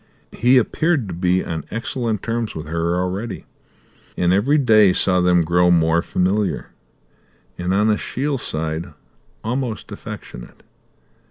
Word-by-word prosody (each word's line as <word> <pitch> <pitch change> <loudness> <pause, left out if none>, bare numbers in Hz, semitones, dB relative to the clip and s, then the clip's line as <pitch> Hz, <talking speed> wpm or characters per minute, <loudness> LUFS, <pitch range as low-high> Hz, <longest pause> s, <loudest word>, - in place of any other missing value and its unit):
He 125 +3 +3
appeared 140 +1 +1
to - - -4
be 90 +2 +1
on 80 -1 -4
excellent 115 -1 -3
terms 115 -1 -2
with 80 - -6
her 85 +2 -1
already, 95 +4 -4 0.7
and 90 0 +2
every 125 +10 +3
day 110 -8 +5
saw 90 -1 +2
them 90 -1 +3
grow 90 +2 +3
more 85 -1 +3
familiar, 95 -1 -1 0.8
and, 90 +1 -3
on 105 +3 +2
Ashiel's 135 +6 -2
side, 80 +2 -4 0.5
almost 120 -1 -3
affectionate. - - -9
95 Hz, 125 wpm, -20 LUFS, 85-115 Hz, 0.8 s, day